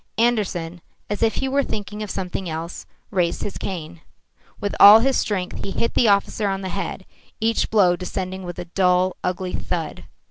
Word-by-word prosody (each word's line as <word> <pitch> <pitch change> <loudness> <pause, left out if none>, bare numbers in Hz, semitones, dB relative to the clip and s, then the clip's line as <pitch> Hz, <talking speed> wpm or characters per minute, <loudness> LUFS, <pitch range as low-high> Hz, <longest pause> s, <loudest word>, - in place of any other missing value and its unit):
Andersen, 190 -8 0 0.3
as 205 - -2
if 225 -1 +2
he 270 - -1
were 275 +1 +2
thinking 210 -4 -5
of 210 - -4
something 185 -1 -4
else, 165 +2 -6 0.2
raised 180 -3 0
his 205 - -5
cane. 170 -3 -6 0.6
With 205 - -2
all 210 +2 +10
his 265 +2 +2
strength 185 -4 -2
he - - -4
hit 230 +4 -1
the 235 - +3
officer 200 +1 +2
on 195 0 -1
the 190 - -4
head, 190 0 -4 0.3
each 225 +1 +1
blow 190 -5 +4
descending 185 +1 -4
with 175 -2 -7
a - - -5
dull, 180 +1 +2
ugly 180 0 -2
thud. 165 -4 -4
190 Hz, 180 wpm, -22 LUFS, 180-210 Hz, 0.6 s, all